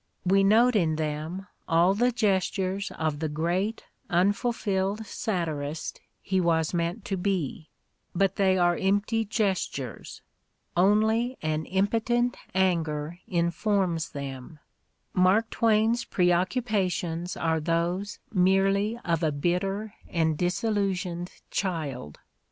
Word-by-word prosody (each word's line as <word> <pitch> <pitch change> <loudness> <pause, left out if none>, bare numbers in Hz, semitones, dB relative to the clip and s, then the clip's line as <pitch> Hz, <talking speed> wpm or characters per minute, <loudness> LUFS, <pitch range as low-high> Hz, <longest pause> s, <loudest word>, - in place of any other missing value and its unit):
We 195 +2 +4
note 230 +5 +5
in 165 -6 +2
them 155 +4 -3 0.2
all 170 +2 +4
the 245 +5 +2
gestures 195 -3 0
of 155 -2 -1
the 160 -1 -1
great 175 +8 -1 0.3
unfulfilled 200 +2 0
satirist 160 -9 -3 0.2
he 190 -1 +1
was 165 -2 +1
meant 175 +5 -2
to 195 - -2
be; 180 -5 -2 0.5
but 195 +1 +2
they 190 -1 +3
are 175 -1 +3
empty 205 +4 +1
gestures; 190 - -2 0.5
only 220 +7 +3
an 155 0 -1
impotent 230 +5 +1 0.2
anger 165 -3 0
informs 170 0 0
them; 140 +1 -7 0.6
Mark 190 +5 +3
Twain's 225 +1 +2
preoccupations 180 -2 0
are 160 -1 +1
those 170 +5 -1 0.2
merely 195 +3 +3
of 170 -2 +1
a 160 -2 +2
bitter 195 +8 -1 0.2
and 160 -2 +1
disillusioned 180 -1 -1 0.2
child. 150 - -3
185 Hz, 105 wpm, -27 LUFS, 165-205 Hz, 0.6 s, note